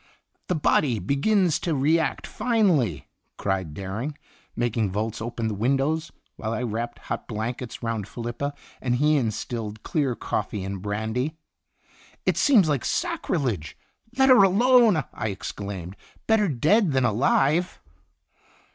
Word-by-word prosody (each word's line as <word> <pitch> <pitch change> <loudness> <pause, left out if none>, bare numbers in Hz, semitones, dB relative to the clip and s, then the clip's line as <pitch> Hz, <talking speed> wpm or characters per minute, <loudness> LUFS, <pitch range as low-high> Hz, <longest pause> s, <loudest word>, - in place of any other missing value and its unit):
"The 180 - 0
body 145 -5 +2
begins 170 - +2
to 165 -3 -1
react 150 +3 +1
finely," 180 - +1 0.3
cried 95 -6 -2
Dering, 105 - -4 0.4
making 115 -3 0
Volz 110 +4 -3
open 115 0 -3
the 110 - -1
windows, 135 +9 0 0.3
while 110 +1 -3
I 115 - -2
wrapped 120 +1 -3
hot - - -5
blankets 120 +3 -5
round 115 -3 -2
Felipa, 120 +6 -4 0.3
and 125 -2 +1
he 150 +4 +3
instilled 110 -3 -3
clear 140 -6 0
coffee 105 -3 -3
and 95 -1 -5
brandy. 110 - -2 0.9
"It - - +2
seems 230 - +5
like 145 -4 0
sacrilege! 145 - -2 0.4
Let 265 0 +5
her 255 -5 +8
alone!" 220 - +5
I 110 - -3
exclaimed. 100 -2 -6 0.2
" - - -32
Better 220 -2 +3
dead 160 - +3
than 130 -1 +2
alive 135 - +2
125 Hz, 130 wpm, -25 LUFS, 110-160 Hz, 0.9 s, her